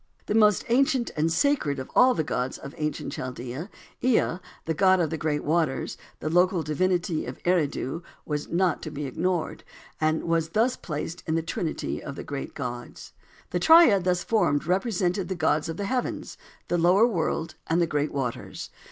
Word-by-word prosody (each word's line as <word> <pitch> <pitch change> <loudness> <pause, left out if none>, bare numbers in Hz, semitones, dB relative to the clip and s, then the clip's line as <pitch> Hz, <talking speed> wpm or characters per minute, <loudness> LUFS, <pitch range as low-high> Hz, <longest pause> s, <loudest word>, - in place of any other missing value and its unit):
The - - -1
most 210 -2 +4
ancient 260 0 +2
and 160 +1 +1
sacred 165 - +1
of 130 - -7
all 255 0 +6
the 160 - 0
gods 130 -3 -2
of 140 - -9
ancient 150 -1 -3
Chaldea, 125 - -5 0.3
Ea, 240 -8 +2 0.3
the 160 - 0
god 190 +3 +4
of 165 -3 0
the 160 - -2
great 150 -1 -1
waters, 155 -3 0 0.3
the - - -3
local 175 +1 +3
divinity 175 +1 0
of 125 - -6
Eridu, 165 -3 0 0.2
was 150 -1 -3
not 175 -1 +1
to - - -5
be 145 +1 -5
ignored, 170 +5 -2 0.4
and 155 0 +1
was 165 -1 0
thus 245 +3 +3
placed 165 +2 -5
in 160 - +1
the 165 - 0
trinity 165 0 -3
of 140 -1 -7
great 140 -1 -5
gods. 120 -3 -6 0.4
The 180 - 0
triad 285 - +7
thus 180 -1 +1
formed 145 -11 +1
represented 185 0 0
the 190 - -3
gods 155 -2 +1
of 165 - -4
the 200 - -2
heavens, 250 +4 -2 0.3
the 175 - +1
lower 180 +6 +5
world, 165 -6 -1
and 165 +2 +2
the 170 - +4
great 150 -2 -1
waters. 130 -4 -4
165 Hz, 180 wpm, -26 LUFS, 150-185 Hz, 0.4 s, triad